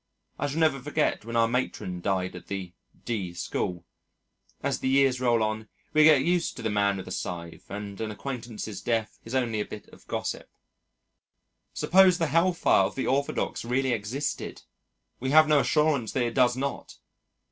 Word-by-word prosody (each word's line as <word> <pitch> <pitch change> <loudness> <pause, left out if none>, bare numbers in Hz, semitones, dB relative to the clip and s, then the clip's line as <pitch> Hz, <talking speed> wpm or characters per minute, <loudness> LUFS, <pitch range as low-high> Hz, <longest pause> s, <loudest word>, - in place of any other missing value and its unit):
I 145 - 0
shall 145 +2 -4
never 155 -4 +3
forget 145 -4 -1
when 115 0 -5
our 115 -1 +4
Matron 115 -7 -2
died 95 -1 -1
at 90 - -10
the 95 -3 -5 0.3
D 95 -7 -3
School.... 85 0 -3 0.8
As - - 0
the - - -2
years 135 -2 +3
roll 120 -3 +3
on, 110 0 -3 0.2
we 155 - +6
get 150 -4 +6
used 175 +1 +1
to 125 - -8
the 110 - 0
man 100 -1 +2
with 95 - -6
the - - -8
scythe 85 -1 -6
and 100 0 -6
an 110 - -2
acquaintance's 110 -2 -6
death 115 -2 -1
is 115 +3 -5
only 120 -4 0
a - - +1
bit 105 - -9
of - - -18
gossip. - - -4 1.3
Suppose 185 -1 +5
the 165 - +1
Hellfire 165 - +4
of - - -4
the 135 - -2
orthodox 140 +2 -1
really 130 +2 0
existed! 120 +7 -3 0.6
We 130 - -2
have 155 +2 +7
no 150 -1 +5
assurance 150 -5 +1
that 130 - +1
it 120 -1 -1
does 125 -1 +3
not! 140 +1 -4
120 Hz, 180 wpm, -27 LUFS, 105-140 Hz, 1.3 s, have